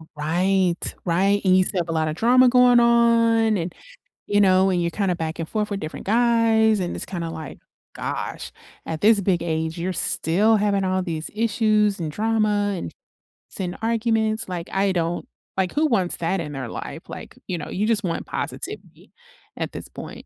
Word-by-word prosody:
Right, 175 +4 +1 0.3
right, 195 +4 +2
and 185 0 +5
you 185 - +5
still 185 0 -2
have 170 - -3
a - - 0
lotta 155 -1 0
drama 245 +8 +5
going 250 -1 +6
on 230 -2 +4
and, 170 0 -4 0.5
you 205 0 +2
know, 190 -1 +4
and 180 -1 +1
you're 170 - 0
kinda 185 0 -1
back 160 0 -4
and 165 -1 -4
forth 210 -1 -2
with 200 0 -3
different 155 - -7
guys, 225 -2 +3
and 175 - -2
it's - - -5
kinda 170 -3 -4
like, 160 -3 -8 0.4
"Gosh, - - -5 0.3
at 160 -1 -4
this 215 0 +5
big 180 -3 0
age, 160 0 -2
you're 185 +2 -2
still 205 +6 +2
having 200 -2 +1
all 185 0 0
these 160 -3 -4
issues 215 -2 +2
and 160 -3 -3
drama 210 -1 +1
and - - -6 0.6
s - - -9
and 180 -1 -3
arguments." 225 -1 0
Like, 175 -2 -5
I 195 0 +1
don't 170 -1 -2 0.3
like, 185 -1 0
who 310 +2 +2
wants 195 -10 +1
that 175 +3 -1
in 150 -3 -5
their 130 -4 -5
life? - - -8
Like, - - -9
you 180 - -2
know, 150 - -6
you 205 +3 -1
just 220 -2 +1
want 170 -3 -3
positivity - - -6 0.5
at - - -4
this - - -7
point - - -9
195 Hz, 190 wpm, -23 LUFS, 170-220 Hz, 0.6 s, going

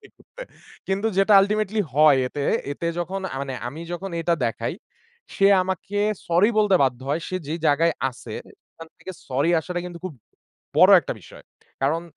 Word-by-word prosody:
করতে। - - -14 0.4
কিন্তু 195 +3 -1
যেটা 195 +2 +4
ultimately 210 +1 0
হয় 150 -1 +5
এতে, 140 +2 -4 0.3
এতে 170 - -5
যখন 185 +3 -3
আ - - -5
মানে 135 -1 -4
আমি 150 +6 -9
যখন 190 +3 -5
এটা 170 +1 +1
দেখাই, 115 +4 -2 0.6
সে 195 - +3 0.2
আমাকে 190 +2 -4 0.3
sorry 175 +5 +3
বলতে 210 -2 +3
বাধ্য 130 -2 0
হয়। 150 +4 0
সে 185 - -2
যে 155 - -2
জায়গায় 160 +3 +3 0.2
আছে 120 -3 -11 0.4
খান 165 - -10
থেকে 185 - -8 0.2
sorry 140 +5 +1
আসাটা 175 +2 -4
কিন্তু 175 -1 -8
খুব 185 -5 -5 0.6
বড় - - +7
একটা - - -5
বিষয়। - - -15 0.4
কারণ 155 +5 +1
170 Hz, 170 wpm, -23 LUFS, 145-195 Hz, 0.6 s, বড়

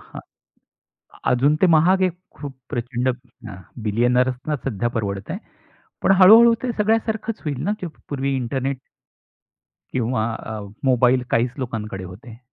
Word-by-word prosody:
हां, - - -11 1.1
अजून 135 +4 +3
ते - - +7
महाग 185 +4 +4
एक 175 +1 -10 0.2
खूप 140 -2 -8
प्रचंड 125 -1 -2 0.7
बिलियनेयर्स 125 +4 +2
ना 150 - +1
सध्या 120 -3 -1
परवडतंय. 100 - -3 0.6
पण - - +3
हळू-हळू 230 +5 +9
ते 250 - 0
सगळ्यासारखंच 220 +1 0
होईल 145 -4 -3
ना. 205 - 0
ते 180 - -3 0.2
पूर्वी 140 -1 -1
इंटरनेट 130 +1 -2 1.2
किंवा 120 -2 0
अ, 110 -2 -6 0.2
मोबाईल 125 0 +3
काहीच 120 +2 +2
लोकांकडे 105 -6 -5
होते. 110 +6 -11
130 Hz, 125 wpm, -22 LUFS, 115-160 Hz, 1.2 s, हळू-हळू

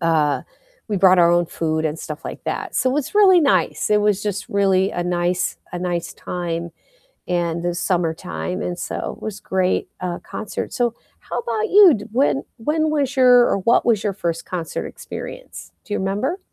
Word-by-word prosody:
uh, 155 -4 +2 0.5
we 205 - -1
brought 185 0 +5
our 170 -1 +6
own 175 -1 +3
food 160 -1 -2
and 155 0 -1
stuff 155 0 -7
like - - -7
that, - - -4
so, 255 - +2
it - - -1
was 295 +7 -2
really 380 -4 +7
nice, 285 -7 +1
it 210 0 +4
was 210 -1 +2
just 205 -1 -3
really 195 -1 +2
a 175 - -2
nice 175 0 0 0.2
a 175 - -3
nice 175 -1 -3
time 170 -1 -4 0.6
in 170 -1 -1
the 175 0 -1
summertime, 180 0 -2
and 180 0 -3
so, - - -4
it - - -19
was 210 -1 -5
great, 185 -2 0
uh, 180 -1 -3
concert, 215 - -6
so, 240 -2 0 0.3
how - - -5
about 230 -2 -2
you? 390 -5 +8
D 210 - -5
when 225 - +2
when 310 +7 0
was 280 -3 0
your 250 -1 +7
or - - +1
what 230 +5 +3
was 220 -4 +2
your 205 - +1
1st 170 -3 -3
concert 170 -3 -4
experience? - - -9
Do 210 - -9
you - - 0
remember? 205 - -1
190 Hz, 190 wpm, -21 LUFS, 175-235 Hz, 0.6 s, you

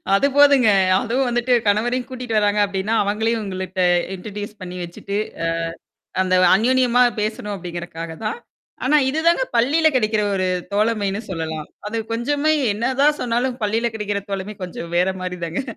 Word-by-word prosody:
அது 275 - +3
போதுங்க. 280 -5 +6 0.3
அதுவும் 255 +2 0
வந்துட்டு 240 +1 +1
கணவரையும் 240 +5 +1
கூட்டிட்டு 250 -4 -3
வராங்க 205 0 +1
அப்பிடின்னா, 200 +2 -1
அவங்களையும் 220 +3 0
உங்கள்ட்ட 185 -1 -3 0.3
இன்ட்ரடியூஸ் 205 +2 -7
பண்ணி 180 0 -7
வச்சுட்டு, 185 +4 -5 1.0
அ - - +1
அந்த 185 0 +1 0.2
அன்யோன்யமா 250 +3 +3 0.2
பேசணும் 215 0 -3
அப்பிடிங்கறக்காக 170 -2 -7
தான். 455 - -2 0.5
ஆனா, 300 +4 +4
இதுதாங்க 320 0 +2
பள்ளியில 290 +7 +3
கிடைக்கிற 215 -3 +2
ஒரு 185 -1 0 0.3
தோழமைன்னு 210 -1 0
சொல்லலாம். 160 -3 -4 0.2
அது 230 - -3
கொஞ்சமே 285 +6 +1 0.2
என்னதான் 265 +7 +2
சொன்னாலும் 245 +1 -1
பள்ளியில 225 +3 +1
கிடைக்கிற 205 -1 -2
தோழமை 195 +2 -4
கொஞ்சம் 170 -1 -7
வேறமாரி 185 0 0
தாங்க. 165 +8 -3
215 Hz, 135 wpm, -21 LUFS, 190-250 Hz, 1.0 s, போதுங்க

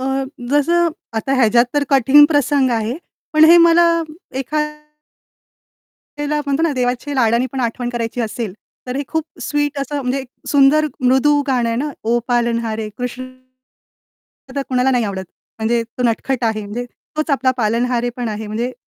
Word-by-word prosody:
अ, - - -3 0.5
जसं 335 +4 +3 0.3
आता 245 +5 -1
ह्याच्यात 235 -1 +4
तर 290 -1 +2
कठीण 275 +2 +6
प्रसंग 285 -3 +2
आहे. 225 +2 -1 0.4
पण 310 0 +6
हे 335 +2 +8
मला 335 +1 +5 0.5
एखाद्याला 300 +2 -5 1.3
म्हणतो 280 +3 0
ना, 330 - +2
देवाच्या 250 +2 -2
लाडाने 235 -1 +2
पण 265 - -3
आठवण 240 +1 -2
करायची 240 0 -3
असेल, 220 -2 -3 0.3
तर 250 +1 -4
हे 280 - -1
खूप 320 -1 -1 0.2
स्वीट 290 -1 -1
असं 285 +1 -3
म्हणजे 255 +1 -1
एक 260 - -10 0.2
सुंदर 285 +2 +4
मृदू 265 +3 +3
गाणं 245 -3 +1
आहे 230 - -1
ना. 290 +4 -2
ओ 235 +2 +2
पालनहारे 230 -2 0
कृष्ण 250 +1 -4 1.3
तर 280 - -1
कुणाला 255 0 +2
नाही 245 -3 +1
आवडत. 190 -2 -4 0.3
म्हणजे 230 +1 +1 0.2
तो - - 0
नटखट 245 +2 0
आहे 220 -1 0
म्हणजे 230 +5 -5 0.3
तोच 310 0 -1
आपला 265 -2 +2
पालनहारे 240 +2 0
पण 245 -2 -3
आहे 215 0 -5
म्हणजे 230 +4 -3
255 Hz, 160 wpm, -18 LUFS, 235-290 Hz, 1.3 s, हे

